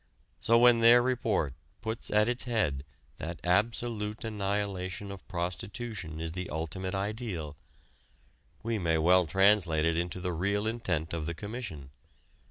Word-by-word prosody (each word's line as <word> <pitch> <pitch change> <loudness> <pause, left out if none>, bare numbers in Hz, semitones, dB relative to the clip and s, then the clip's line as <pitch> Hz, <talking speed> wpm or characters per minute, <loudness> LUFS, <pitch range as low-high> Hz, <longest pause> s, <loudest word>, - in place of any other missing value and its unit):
So 115 - +4
when 120 0 +6
their 115 +1 +8
report 115 - 0 0.3
puts 110 0 -4
at 105 +1 +3
its 120 +1 -1
head 90 - 0 0.3
that 80 -1 -5
absolute 105 +3 0
annihilation 100 -2 -2
of 100 -2 -10
prostitution 95 0 -4
is 80 0 -3
the 90 +2 -5
ultimate 95 +5 -3
ideal, 95 - -3 1.1
we 115 -1 -1
may 80 -3 +1
well 90 +2 +4
translate 95 -4 +4
it 85 0 +2
into 85 +2 -2
the 90 0 -2
real 100 +5 0
intent 95 -9 -1
of 80 -2 -3
the 85 - -3
Commission. 100 - -6
95 Hz, 140 wpm, -30 LUFS, 85-110 Hz, 1.1 s, their